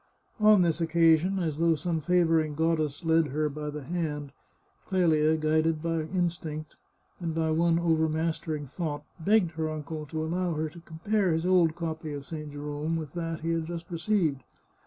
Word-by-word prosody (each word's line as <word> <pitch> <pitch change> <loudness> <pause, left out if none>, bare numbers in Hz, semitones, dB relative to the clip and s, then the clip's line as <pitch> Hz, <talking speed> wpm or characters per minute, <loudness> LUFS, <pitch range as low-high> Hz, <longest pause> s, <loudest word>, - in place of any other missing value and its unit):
On 210 -3 +6
this 170 -1 0
occasion, 165 +3 +3
as 160 -5 -2
though 165 -1 +4
some 160 +1 -2
favouring 165 -3 +2
goddess 160 -1 0
led 160 -1 +4
her 150 +2 -1
by 150 +1 -5
the 150 -1 -6
hand, 150 -2 -3 0.6
Clelia, 160 -4 +3
guided 155 +1 +1
by 165 -1 0
instinct, 160 -3 -3 0.4
and 165 -3 -3
by 160 -1 +1
one 165 +1 +3
overmastering 160 -2 0
thought, 145 +1 -4 0.2
begged 195 0 +3
her 160 -1 -2
uncle 155 0 -5
to 155 +2 -3
allow 175 +1 -1
her 155 +1 -1
to 170 +3 -13
compare 175 +4 -1
his 160 +2 -1
old 175 -3 +4
copy 160 -2 -4
of 140 -1 -6
St. 150 -1 -7
Jerome 145 +2 -3
with 155 -4 -5
that 165 -2 -4
he 165 +1 -1
had 165 -1 -1
just 170 +1 -7
received. 165 -5 0
160 Hz, 170 wpm, -28 LUFS, 155-170 Hz, 0.6 s, On